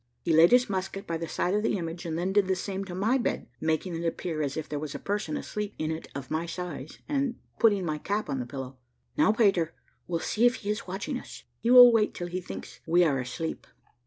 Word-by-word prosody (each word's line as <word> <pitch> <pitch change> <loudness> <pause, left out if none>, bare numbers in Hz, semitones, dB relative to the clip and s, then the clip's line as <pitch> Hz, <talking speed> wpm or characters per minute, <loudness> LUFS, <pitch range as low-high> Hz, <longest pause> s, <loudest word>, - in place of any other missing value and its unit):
He 165 - +1
laid 165 +2 +7
his 245 0 +5
musket 195 0 -3
by 165 -3 -2
the 165 0 -4
side 180 - -1
of 210 - +2
the 210 - +1
image, 170 0 -5
and 160 -1 -2
then 185 +3 -1
did 205 -2 +4
the 190 - +2
same 195 +1 -3
to 180 -2 -7
my 220 +8 +2
bed, - - -2
making 160 +3 -1
it 165 - -4
appear 165 -1 -2
as 140 -1 -2
if 155 -1 -3
there 150 - -3
was 150 -1 -5
a - - -1
person 200 -6 -2
asleep 210 -1 -4
in 155 0 -1
it 160 0 -5
of 140 -2 -6
my 160 +2 -1
size, 170 -5 -6
and 275 -4 0 0.2
putting 205 -5 +4
my 155 -2 -2
cap 205 +5 -2
on 135 - -2
the 125 - -4
pillow. 130 0 -7 0.4
"Now, 300 -7 +4
Peter, 195 -7 +2 0.3
we'll 170 -2 -1
see 225 +8 +3
if 245 - +1
he 205 - +1
is 210 -1 -4
watching 210 +9 -3
us. - - -11 0.2
He 230 - -1
will 245 -1 +10
wait 215 -2 +2
till 175 - -4
he 185 +1 -3
thinks 180 - -8
we 175 +2 +5
are 140 -5 +2
asleep." 130 +6 -4
180 Hz, 245 wpm, -28 LUFS, 160-210 Hz, 0.4 s, will